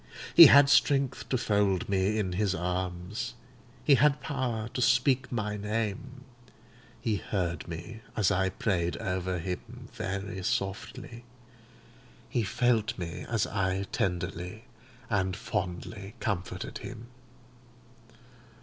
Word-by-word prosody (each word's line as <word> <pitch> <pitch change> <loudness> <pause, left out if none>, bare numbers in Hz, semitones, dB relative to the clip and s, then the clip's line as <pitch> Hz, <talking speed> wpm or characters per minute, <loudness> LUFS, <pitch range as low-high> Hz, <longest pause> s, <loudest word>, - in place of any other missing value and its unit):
He 170 -2 +12
had 140 +1 +8
strength 135 -4 +2
to 130 - +2
fold 100 -5 +1
me 100 +2 +1
in 100 -4 0
his 95 0 +1
arms; 90 +6 -3 0.5
he 145 - +5
had 140 +2 +4
power 125 -6 -2
to 125 - -2
speak 125 +1 +3
my 105 -3 -2
name; 110 +5 -3 0.8
he 110 -2 0
heard 90 -8 -3
me 85 +7 -7 0.2
as 105 -3 +3
I 95 -1 +2
prayed 95 -5 -1
over 90 -1 -2
him 115 +8 -6
very 95 -2 -4
softly; 100 +5 -3 1.0
he 120 - 0
felt 115 0 +1
me 85 -2 -5
as 115 -3 +1
I 95 -1 -1
tenderly 90 +3 -2 0.4
and 95 -5 0
fondly 95 +1 -4
comforted 95 -4 -3
him. 115 - -8
105 Hz, 115 wpm, -29 LUFS, 95-120 Hz, 1.0 s, He